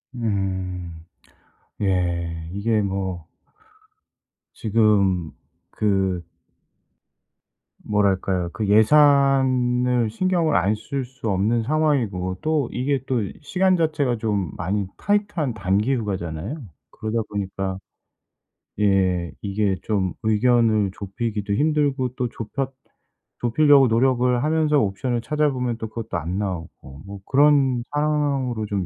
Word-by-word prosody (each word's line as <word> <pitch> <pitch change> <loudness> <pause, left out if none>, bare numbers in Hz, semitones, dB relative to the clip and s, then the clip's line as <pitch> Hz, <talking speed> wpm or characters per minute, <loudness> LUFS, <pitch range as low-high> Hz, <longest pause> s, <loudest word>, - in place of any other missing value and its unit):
음. 95 -6 -3 0.8
예 85 -4 -1
이게 110 +2 0
뭐 95 -4 -3 1.3
지금 100 -6 +2 0.4
그 95 -4 0 1.6
뭐랄까요. 95 -3 0
그 110 -3 -2
예산을 125 -1 +4
신경을 170 +4 +1
안 100 +5 +2
쓸 130 +5 -4
수 125 -2 -6
없는 105 +4 +1
상황이고 115 -11 0
또 155 -5 0
이게 135 +1 -1
또 125 -5 +1 0.2
시간 185 +3 +2
자체가 150 -7 0
좀 105 -7 -1
많이 100 +4 -1
타이트한 205 - 0
단기 105 +5 +1
휴가잖아요. 95 - -4 0.4
그러다 110 +1 -3
보니까 95 -1 -3 1.0
예 95 -4 +2
이게 100 -1 0
좀 95 -4 -1
의견을 110 -2 +3
좁히기도 105 +1 -3
힘들고 145 -1 +1
또 125 -2 -2
좁혔 115 +5 -4 0.7
좁히려고 140 +2 +5
노력을 125 +1 +2
하면서 155 -1 +2
옵션을 120 +3 -1
찾아보면 130 -3 0
또 110 - -5
그것도 115 0 -4
안 85 +5 -3
나오고 80 -7 -6
뭐 100 0 -8
그런 135 -3 +3
상황으로 145 -6 0
좀 100 -3 -2
110 Hz, 225 characters per minute, -23 LUFS, 95-135 Hz, 1.6 s, 좁히려고